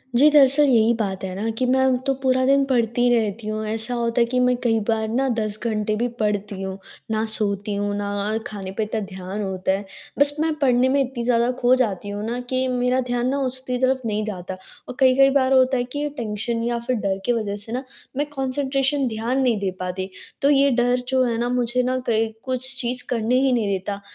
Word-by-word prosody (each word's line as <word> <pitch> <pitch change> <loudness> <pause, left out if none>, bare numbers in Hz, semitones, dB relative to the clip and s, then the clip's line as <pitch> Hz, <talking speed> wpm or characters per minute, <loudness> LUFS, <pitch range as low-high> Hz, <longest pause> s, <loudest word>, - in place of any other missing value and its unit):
जी, 290 +5 +7
दरअसल 290 0 +6
यही 230 -2 +4
बात 195 -3 -2
है 185 - -4
ना 220 +3 -2
कि 255 - +1
मैं 265 -1 +3
तो 275 - +2
पूरा 260 -1 +2
दिन 275 +1 +4
पढ़ती 240 -3 0
रहती 220 -1 -1
हूँ, 215 0 -3
ऐसा 225 +3 -2
होता 235 0 0
है - - +5
कि 250 +1 0
मैं 250 0 +3
कई 225 -2 +2
बार 220 -1 0
ना 260 +4 +1
10 215 -1 -2
घंटे 215 -2 -1
भी 235 +3 0
पढ़ती 205 -2 -1
हूँ। 190 0 -4 0.3
ना 220 0 0
सोती 205 -1 -1
हूँ, 205 0 -1
ना 205 0 -3 0.3
अ, 220 - +1
खाने 195 -3 -7
पे 220 - +1
इतना 215 +1 -2
ध्यान 190 +2 -6
होता 190 -1 -1
है। 195 +1 -2 0.3
बस 285 0 +3
मैं 315 0 +1
पढ़ने 255 -2 +3
में 275 +1 +2
इतनी 245 -2 -5
ज़्यादा 240 0 +2
खो 245 +1 +4
जाती 205 -3 -2
हूँ 205 +1 -4
ना 235 +2 -3
कि 260 0 0
मेरा 250 0 +1
ध्यान 245 0 0
ना 280 - 0
उसकी 255 0 -4
तरफ़ 260 0 +2
नहीं 215 -1 -1
जाता। 190 -3 -5 0.3
और - - -7
कई-कई 265 +1 +5
बार 265 -1 +3
होता 260 0 +4
है 245 - 0
कि 290 +1 -2
टेंशन 230 +1 -2
या 235 0 -1
फिर 255 - +1
डर 195 -3 -1
की 245 - +2
वजह 215 -3 -2
से 205 +2 -10
ना 250 +3 -2 0.3
मैं 290 - +1
कंसंट्रेशन 270 +1 0
ध्यान 235 +4 -1
नहीं 240 -5 +2
दे 195 -1 -1
पाती 185 +1 -4 0.3
तो 280 - +4
ये 280 -1 +5
डर 245 +1 +2
जो 260 0 +2
है 235 -2 0
ना 240 +1 -1
मुझे 250 0 +1
ना 255 +1 0
कहीं 220 0 +1
कुछ 260 0 -2
चीज़ 250 +1 -2
करने 235 +1 0
ही 270 -1 +3
नहीं 230 -4 +1
देता, 200 +1 -3
235 Hz, 225 wpm, -22 LUFS, 215-260 Hz, 0.3 s, जी